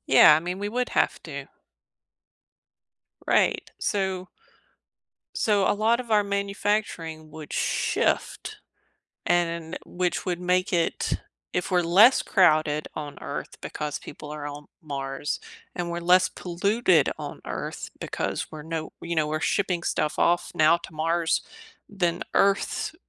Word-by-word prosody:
Yeah, 135 +3 +8
I 155 - +2
mean, 180 +2 -4
we 205 +1 -2
would 250 +3 -1
have - - +1
to. - - -6 1.8
Right, - - +2
so 190 -3 -1 1.1
so, 205 -3 +2
a - - +4
lot 225 +3 +2
of 240 -2 -9
our 210 -1 +4
manufacturing 200 -5 -2
would 155 -1 -10
shift. - - 0 0.7
And 170 0 0
which 180 0 -2
would 180 -2 -1
make 180 +1 +1
it 170 -2 0 0.3
if - - -1
we're 180 - +4
less 200 +10 +6
crowded 155 -4 +3
on 150 -2 -6
Earth - - -6
because 150 -1 -4
people 150 - -10
are 150 -1 -5
on 145 0 -8
Mars, 140 -2 -4 0.3
and 175 -1 -3
we're 170 - -2
less 180 +2 +5
polluted 185 - +2
on - - -7
Earth - - -5
because - - -3
we're 155 -1 -7
no 160 0 -4
you 170 0 -3
know, 155 -1 +2
we're 155 +1 -2
shipping 180 -3 0
stuff 150 - -1
off 175 0 +2
now 155 +2 +5
to 170 - -11
Mars 165 +1 +1 0.5
than 175 -4 -1
Earth, 195 0 +2
175 Hz, 140 wpm, -26 LUFS, 155-195 Hz, 1.8 s, Yeah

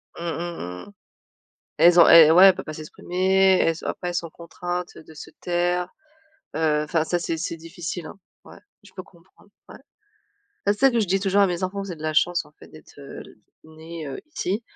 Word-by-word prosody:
Mmh, - - -10
mmh, 170 0 -4
mmh 90 - -8
mh. - - -15 0.9
Elles 175 0 +6
ont - - +7
et 165 -2 +9
ouais, 180 +4 +8
elles 190 - +6
peuvent - - -8
pas 155 - -7
s'exprimer, 185 +4 +1
elles 165 0 0
ont - - -4
après 180 - -4
elles 175 - -5
sont 170 -2 -3
contraintes, 175 +2 -6
de 160 0 -14
se - - -11
taire. 175 0 -1 0.7
Heu, 155 -2 +1
enfin 155 +1 0
ça 175 +2 -2
c'est 165 -1 -3
c'est 165 0 -4
difficile, 165 +1 -7
hein. - - -13 0.2
Ouais, - - -15 0.3
je 200 - -18
peux 185 - -7
comprendre 190 +3 -24 0.2
ouais. - - -11 0.9
Bah, 205 - +3
c'est 205 - -9
ça 270 0 +5
que 235 - 0
je 210 - +1
dis 195 +2 0
toujours 200 +1 +2
à - - +5
mes 180 0 -3
enfants: 195 +2 -3
«Vous 195 - -8
avez 165 - -7
de - - -11
la 155 0 -2
chance 175 +3 +1
en - - -22
fait - - -17
d'être, 155 -1 -17
heu, 140 -1 -10 0.4
nés, 160 0 -10
heu, 135 - -7
ici. 225 - -3
175 Hz, 225 wpm, -23 LUFS, 160-185 Hz, 0.9 s, et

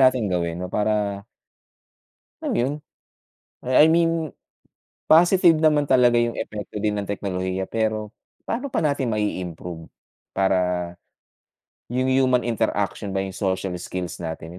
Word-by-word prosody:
nating 130 -6 +3
gawin, 85 -2 -1
'no, 90 +1 -6
para 105 -2 -1 1.2
Ano - - -1
yun, 130 +4 +1 1.0
eh, 130 - +2
I - - +6
mean, 165 -2 +1 0.8
positive 175 +1 +6
naman 150 -2 +3
talaga 120 -2 +5
yung 120 0 -1
epekto 105 -1 -6
din 105 0 0
ng 100 - -7
teknolohiya 95 -2 -2
pero, 110 +1 -2 0.3
pa'no 255 +5 -3
pa 245 - -1
natin 140 -4 0
mai-improve 90 -6 -4 0.5
para, 90 -2 +1 1.0
yung 130 +1 0
human 130 -1 +3
interaction 105 -3 -1
ba 95 - 0
yung 95 -1 -6
social 95 -1 -1
skills 90 -1 -5
natin, 80 +1 -6
105 Hz, 130 wpm, -23 LUFS, 95-130 Hz, 1.2 s, I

